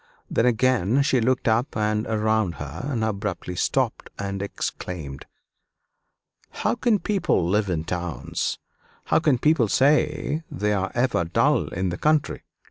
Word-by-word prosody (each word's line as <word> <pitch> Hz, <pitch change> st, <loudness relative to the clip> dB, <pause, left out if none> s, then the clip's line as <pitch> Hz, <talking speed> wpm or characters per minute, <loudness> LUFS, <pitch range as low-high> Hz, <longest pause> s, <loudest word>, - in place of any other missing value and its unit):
Then 115 Hz, -, +2 dB
again 125 Hz, 0 st, +2 dB
she 135 Hz, -3 st, +2 dB
looked 125 Hz, +2 st, +1 dB
up 115 Hz, +4 st, +1 dB
and 105 Hz, 0 st, 0 dB
around 110 Hz, -4 st, +1 dB
her, 75 Hz, -, -6 dB
and 120 Hz, -6 st, -1 dB
abruptly 100 Hz, -4 st, -3 dB
stopped -, -, -1 dB
and 100 Hz, -1 st, -4 dB
exclaimed: 85 Hz, -7 st, -5 dB, 1.2 s
"How -, -, -1 dB
can 235 Hz, -2 st, +2 dB
people 195 Hz, -, 0 dB
live 105 Hz, +2 st, +1 dB
in 80 Hz, -3 st, -1 dB
towns 85 Hz, -6 st, -3 dB, 0.5 s
how -, -, +3 dB
can 150 Hz, -5 st, +2 dB
people 145 Hz, -3 st, +3 dB
say 150 Hz, +5 st, +2 dB
they 105 Hz, +2 st, -1 dB
are 95 Hz, -1 st, -1 dB
ever 120 Hz, -7 st, +1 dB
dull 85 Hz, -, +2 dB
in 95 Hz, +1 st, -2 dB
the 85 Hz, -, -5 dB
country? 155 Hz, -1 st, +1 dB
110 Hz, 140 wpm, -24 LUFS, 90-130 Hz, 1.2 s, how